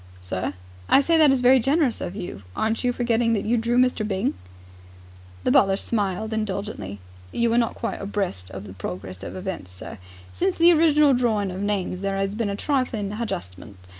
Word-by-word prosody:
"Sir?" 90 Hz, +1 st, -3 dB, 0.3 s
"I -, -, +7 dB
say 330 Hz, +4 st, +2 dB
that 300 Hz, -3 st, +7 dB
is 265 Hz, -2 st, +2 dB
very 255 Hz, +1 st, +6 dB
generous 275 Hz, 0 st, +1 dB
of 175 Hz, -, -4 dB
you. 175 Hz, -, -6 dB
Aren't 220 Hz, +2 st, 0 dB
you 250 Hz, -, +2 dB
forgetting 235 Hz, -1 st, +1 dB
that 205 Hz, -, -1 dB
you 230 Hz, +3 st, +2 dB
drew 235 Hz, +1 st, +1 dB
Mr. 250 Hz, -2 st, +3 dB
Byng?" 195 Hz, -2 st, -1 dB, 1.1 s
The -, -, +2 dB
butler 195 Hz, -1 st, +4 dB
smiled 210 Hz, 0 st, -2 dB
indulgently. 200 Hz, -, -3 dB, 0.3 s
"You 235 Hz, -1 st, +1 dB
are -, -, +3 dB
not 230 Hz, -, 0 dB
quite -, -, -4 dB
abreast 195 Hz, -, -3 dB
of 95 Hz, 0 st, -7 dB
the 95 Hz, -, -10 dB
progress 95 Hz, 0 st, -6 dB
of -, -, -7 dB
events, 185 Hz, -, -5 dB
sir. 90 Hz, 0 st, -9 dB, 0.3 s
Since 375 Hz, +1 st, 0 dB
the 340 Hz, +1 st, +6 dB
original 300 Hz, -3 st, +5 dB
drawing 220 Hz, -6 st, +1 dB
of 185 Hz, +2 st, -5 dB
names, 200 Hz, -3 st, -1 dB
there 195 Hz, 0 st, -2 dB
'as 195 Hz, 0 st, -1 dB
been 215 Hz, -1 st, -1 dB
a 200 Hz, -, -2 dB
trifling 240 Hz, -6 st, -1 dB
hadjustment. 175 Hz, -, -5 dB
210 Hz, 190 wpm, -24 LUFS, 185-245 Hz, 1.1 s, I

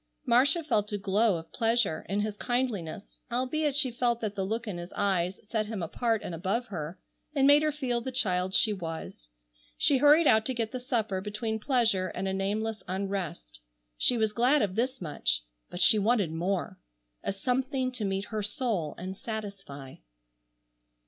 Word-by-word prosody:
Marcia 265 Hz, +7 st, +4 dB
felt 215 Hz, -8 st, 0 dB
a 205 Hz, -, -1 dB
glow 200 Hz, 0 st, +2 dB
of 160 Hz, 0 st, -11 dB
pleasure 230 Hz, -7 st, +1 dB
in 200 Hz, +2 st, 0 dB
his 210 Hz, 0 st, -2 dB
kindliness, 215 Hz, -7 st, -3 dB
albeit 270 Hz, +4 st, 0 dB
she 275 Hz, -3 st, +3 dB
felt 240 Hz, 0 st, 0 dB
that 215 Hz, -3 st, -3 dB
the 195 Hz, -2 st, -2 dB
look 225 Hz, +4 st, -3 dB
in 185 Hz, -4 st, -4 dB
his 175 Hz, +1 st, -8 dB
eyes 190 Hz, -2 st, 0 dB
set 215 Hz, -1 st, -1 dB
him 210 Hz, -5 st, -4 dB
apart 225 Hz, +6 st, -1 dB
and -, -, -5 dB
above 195 Hz, +8 st, -1 dB
her, 165 Hz, -2 st, -5 dB, 0.4 s
and 270 Hz, -1 st, +4 dB
made 290 Hz, +1 st, +7 dB
her 305 Hz, 0 st, +1 dB
feel 255 Hz, -5 st, -1 dB
the 260 Hz, -, -4 dB
child 190 Hz, -7 st, +1 dB
she 215 Hz, -, +4 dB
was. 165 Hz, -, -7 dB, 0.5 s
She 285 Hz, -3 st, +4 dB
hurried 295 Hz, +4 st, +6 dB
out 220 Hz, -5 st, +5 dB
to 260 Hz, -, -1 dB
get 225 Hz, -2 st, -2 dB
the 255 Hz, -, -4 dB
supper 220 Hz, -6 st, -1 dB
between 220 Hz, +2 st, -3 dB
pleasure 225 Hz, -7 st, +2 dB
and 190 Hz, +1 st, -4 dB
a 190 Hz, -, -1 dB
nameless 210 Hz, +3 st, -2 dB
unrest. 185 Hz, -, -4 dB, 0.4 s
She 245 Hz, -, +3 dB
was 220 Hz, -1 st, +1 dB
glad 255 Hz, +6 st, +3 dB
of 195 Hz, -3 st, -1 dB
this 255 Hz, +4 st, -1 dB
much, 105 Hz, -, 0 dB, 0.3 s
but 175 Hz, -, -7 dB
she 215 Hz, +4 st, +6 dB
wanted 205 Hz, -5 st, +2 dB
more, 175 Hz, +4 st, -2 dB, 0.4 s
a -, -, -1 dB
something 255 Hz, +5 st, -1 dB
to 250 Hz, -4 st, -4 dB
meet 195 Hz, 0 st, -1 dB
her 215 Hz, -, 0 dB
soul 210 Hz, -, -2 dB
and 185 Hz, +2 st, -6 dB
satisfy. 195 Hz, -, -7 dB
215 Hz, 180 wpm, -29 LUFS, 190-245 Hz, 0.5 s, made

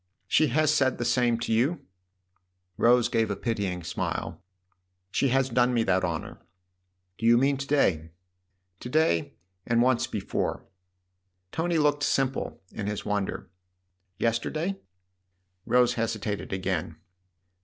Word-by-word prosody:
"She 155 Hz, -, +4 dB
has 155 Hz, +3 st, +2 dB
said 130 Hz, -4 st, +2 dB
the 120 Hz, -, -2 dB
same 120 Hz, -1 st, +2 dB
to 120 Hz, -, -1 dB
you? 140 Hz, +6 st, +1 dB, 0.5 s
" 90 Hz, 0 st, -47 dB
Rose 120 Hz, 0 st, +5 dB
gave 115 Hz, -1 st, 0 dB
a 100 Hz, -, -1 dB
pitying 100 Hz, -7 st, -2 dB
smile. -, -, -4 dB, 0.3 s
" -, -, -50 dB, 0.3 s
She 140 Hz, -, +1 dB
has 135 Hz, +1 st, +2 dB
done 125 Hz, +1 st, +3 dB
me 115 Hz, -, +3 dB
that 95 Hz, -2 st, +1 dB
honour." 85 Hz, -3 st, -4 dB, 0.4 s
" 90 Hz, 0 st, -50 dB
Do 115 Hz, -, +1 dB
you 120 Hz, 0 st, +6 dB
mean 135 Hz, +3 st, +3 dB
to 135 Hz, +1 st, -5 dB
day? 90 Hz, -, +2 dB, 0.2 s
" 90 Hz, +1 st, -50 dB
" 90 Hz, 0 st, -48 dB
To 125 Hz, -, -7 dB
day 140 Hz, -, +1 dB, 0.3 s
and 115 Hz, +2 st, +1 dB
once 125 Hz, -1 st, +2 dB
before." -, -, -3 dB, 0.9 s
Tony 165 Hz, +1 st, 0 dB
looked 145 Hz, -1 st, +2 dB
simple 135 Hz, -7 st, -1 dB
in 100 Hz, -, -5 dB
his 105 Hz, -1 st, -4 dB
wonder. 100 Hz, -3 st, -3 dB, 0.7 s
"Yester 115 Hz, 0 st, 0 dB
day?" 180 Hz, +5 st, -3 dB, 0.9 s
Rose 125 Hz, -1 st, +4 dB
hesitated 110 Hz, -3 st, -3 dB
again. 90 Hz, -4 st, -2 dB
115 Hz, 150 wpm, -27 LUFS, 95-135 Hz, 0.9 s, you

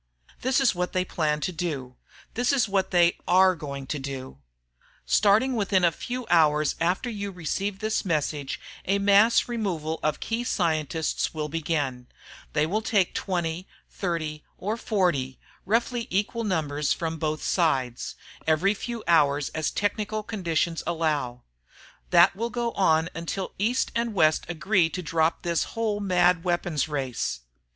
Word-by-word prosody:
This 260 Hz, +1 st, +2 dB
is 270 Hz, -3 st, +3 dB
what 180 Hz, 0 st, -2 dB
they 185 Hz, 0 st, +1 dB
plan 150 Hz, -3 st, -1 dB
to 165 Hz, -, -1 dB
do 150 Hz, -7 st, -4 dB, 0.4 s
this 245 Hz, +3 st, +1 dB
is 260 Hz, -6 st, +2 dB
what 195 Hz, -1 st, 0 dB
they 175 Hz, -1 st, +3 dB
are 185 Hz, +1 st, +5 dB
going 140 Hz, -3 st, -6 dB
to 145 Hz, +2 st, -3 dB
do. 135 Hz, -, -7 dB, 0.7 s
Starting 215 Hz, +6 st, +4 dB
within 195 Hz, -4 st, +2 dB
a 170 Hz, -, +5 dB
few 250 Hz, +8 st, -5 dB
hours 155 Hz, -3 st, +4 dB
after 180 Hz, +8 st, +1 dB
you 200 Hz, -4 st, -4 dB
receive 190 Hz, +3 st, -3 dB
this 215 Hz, +1 st, -1 dB
message, 150 Hz, -5 st, -1 dB, 0.3 s
a 195 Hz, +2 st, +2 dB
mass 200 Hz, +3 st, +5 dB
removal 180 Hz, -10 st, -2 dB
of 155 Hz, -1 st, 0 dB
key 230 Hz, +2 st, -2 dB
scientists 160 Hz, -, -1 dB
will 150 Hz, -1 st, -3 dB
begin. 145 Hz, -6 st, -2 dB, 0.5 s
They 150 Hz, 0 st, +2 dB
will 205 Hz, +7 st, -1 dB
take 205 Hz, -4 st, +1 dB
20, 175 Hz, -1 st, -2 dB, 0.2 s
30, 155 Hz, -5 st, -3 dB
or 210 Hz, +4 st, -2 dB
40 175 Hz, -, 0 dB, 0.3 s
roughly 235 Hz, +2 st, 0 dB
equal 210 Hz, +4 st, -1 dB
numbers 150 Hz, -6 st, 0 dB
from 165 Hz, -1 st, -4 dB
both 155 Hz, 0 st, -2 dB
sides 130 Hz, -9 st, 0 dB, 0.3 s
every 165 Hz, +6 st, +3 dB
few 235 Hz, +2 st, -5 dB
hours 145 Hz, -3 st, +3 dB
as 155 Hz, -1 st, -1 dB
technical 210 Hz, +1 st, -2 dB
conditions 170 Hz, -5 st, -1 dB
allow. 150 Hz, -7 st, -1 dB, 0.7 s
That 175 Hz, +2 st, +6 dB
will 230 Hz, +4 st, -2 dB
go 240 Hz, -1 st, -2 dB
on 160 Hz, -5 st, +2 dB
until 170 Hz, +3 st, -4 dB
East 240 Hz, +6 st, +1 dB
and 230 Hz, -2 st, -1 dB
West 155 Hz, -3 st, +3 dB
agree 175 Hz, +1 st, +2 dB
to 180 Hz, +2 st, -5 dB
drop 165 Hz, 0 st, +1 dB
this 170 Hz, -1 st, +1 dB
whole 215 Hz, -2 st, 0 dB
mad 180 Hz, -3 st, +3 dB
weapons 175 Hz, -4 st, 0 dB
race. 130 Hz, -, -3 dB
175 Hz, 150 wpm, -26 LUFS, 155-205 Hz, 0.7 s, That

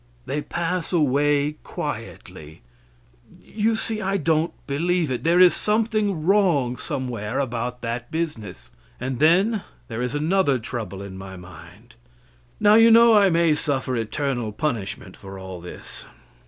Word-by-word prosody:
They 150 Hz, -, -2 dB
pass 170 Hz, +2 st, -3 dB
away 145 Hz, -1 st, +2 dB
quietly. 75 Hz, -2 st, -7 dB, 0.8 s
You 220 Hz, +1 st, -1 dB
see 220 Hz, 0 st, -3 dB
I 195 Hz, 0 st, 0 dB
don't 160 Hz, -1 st, +1 dB
believe 165 Hz, +2 st, 0 dB
it. 125 Hz, -, -3 dB
There 170 Hz, +2 st, +3 dB
is 180 Hz, -1 st, +7 dB
something 210 Hz, -6 st, 0 dB
wrong 170 Hz, -11 st, +3 dB
somewhere 120 Hz, -4 st, -4 dB
about 125 Hz, -2 st, -3 dB
that 120 Hz, +1 st, -4 dB
business. 150 Hz, -, -5 dB, 0.3 s
And 130 Hz, 0 st, -4 dB
then 190 Hz, +8 st, +3 dB, 0.3 s
there 115 Hz, 0 st, -4 dB
is 125 Hz, +2 st, -2 dB
another 155 Hz, -2 st, +2 dB
trouble 110 Hz, -5 st, -6 dB
in 95 Hz, -1 st, -9 dB
my 95 Hz, 0 st, -9 dB
mind. 90 Hz, 0 st, -14 dB, 0.7 s
Now, 210 Hz, 0 st, +5 dB
you 225 Hz, +1 st, +7 dB
know 230 Hz, 0 st, +7 dB
I 205 Hz, -2 st, +6 dB
may 170 Hz, -2 st, +3 dB
suffer 135 Hz, -3 st, -1 dB
eternal 120 Hz, 0 st, -2 dB
punishment 115 Hz, -4 st, -4 dB
for 95 Hz, 0 st, -10 dB
all 95 Hz, -2 st, -8 dB
this. 90 Hz, -, -10 dB
145 Hz, 140 wpm, -23 LUFS, 120-180 Hz, 0.8 s, is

